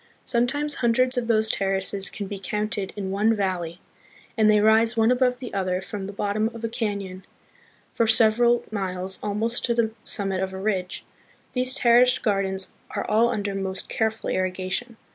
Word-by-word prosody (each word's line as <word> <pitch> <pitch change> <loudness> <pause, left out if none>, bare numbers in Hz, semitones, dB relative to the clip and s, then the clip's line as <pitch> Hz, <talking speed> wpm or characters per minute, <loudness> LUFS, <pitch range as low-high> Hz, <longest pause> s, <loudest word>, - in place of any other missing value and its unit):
Sometimes 275 +5 +1
hundreds 255 +2 +3
of 245 -2 -1
these 220 -1 +2
terraces 195 -1 -1
can 205 - -6
be 195 0 -6
counted 210 +1 -2
in 195 -2 -4
one 215 +3 +2
valley, 180 -4 -2 0.6
and 215 -2 +4
they 210 0 +5
rise 220 +2 +4
one 225 +2 +4
above 250 0 +2
the 250 -1 -8
other 185 -2 -1
from 190 0 -6
the - - -6
bottom 205 +2 -1
of 230 - -9
a 230 - -1
canon 200 -5 -4 0.7
for 230 - +1
several 235 +2 +4
miles 190 -2 -2
almost 220 +3 -1
to 235 - 0
the 230 -2 +1
summit 195 -2 -1
of 190 0 -3
a - - -5
ridge. 190 -3 -2 0.5
These 255 0 +1
terraced 245 +1 +4
gardens 195 -3 -1 0.2
are - - -2
all 225 +3 +3
under 205 -4 -2
most 190 -1 -4
careful 220 0 -1
irrigation. 185 +5 -2
210 Hz, 170 wpm, -24 LUFS, 195-230 Hz, 0.7 s, they